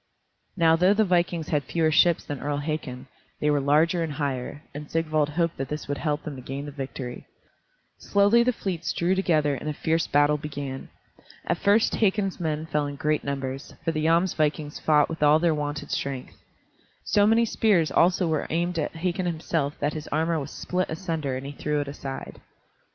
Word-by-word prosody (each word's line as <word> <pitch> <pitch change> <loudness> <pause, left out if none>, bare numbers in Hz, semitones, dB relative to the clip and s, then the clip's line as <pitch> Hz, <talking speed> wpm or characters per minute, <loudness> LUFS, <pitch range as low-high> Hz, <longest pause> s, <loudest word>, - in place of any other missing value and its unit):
Now 165 -2 +5
though 180 +4 +4
the 220 0 +3
vikings 175 -3 +1
had 150 -2 +1
fewer 160 +3 +1
ships 170 +2 +4
than 145 -2 -5
Earl 145 +1 -2
Hakon, 145 -4 -4 0.3
they 150 - +2
were 145 -1 +2
larger 155 +5 +3
and 160 -3 -2
higher, 145 0 -3
and 145 +1 -8
Sigvald 155 -2 +1
hoped 165 +2 -1
that 135 -1 -4
this 150 +1 -5
would 145 -1 -3
help 150 0 -1
them 150 - -6
to - - -8
gain 135 +3 -5
the 145 - -6
victory. 135 -3 -6 0.7
Slowly 205 +4 +4
the 250 +1 +3
fleets 175 -7 -3
drew 175 +2 +1
together 155 -6 +2
and 140 +3 -4
a - - -2
fierce 160 +2 0
battle 145 +1 +3
began. 140 -3 -6 0.6
At - - -1
first 205 +3 +3
Hakon's 195 -2 +1
men 155 -2 -2
fell 150 -2 -1
in 145 - -5
great 150 +2 0
numbers, 135 -1 -4
for 165 - +2
the 155 -1 -2
Jomsvikings 160 -3 +1
fought 150 -2 +4
with 165 -1 -6
all 150 +1 +6
their 165 0 +2
wonted 145 -1 -4
strength. 135 -2 -3 0.7
So 205 0 +3
many 225 +2 +4
spears 200 -8 +2
also 180 +1 +3
were 155 -2 -1
aimed 170 +1 -1
at 150 - -3
Hakon 180 +2 -1
himself 160 -3 -2
that 145 +1 0
his 155 -1 -6
armor 160 +2 0
was 140 0 -5
split 185 +3 -2
asunder 160 -5 -3
and 130 - -7
he 140 - -5
threw 150 +1 -2
it 145 - -3
aside. 140 -1 -7
155 Hz, 195 wpm, -26 LUFS, 145-170 Hz, 0.7 s, all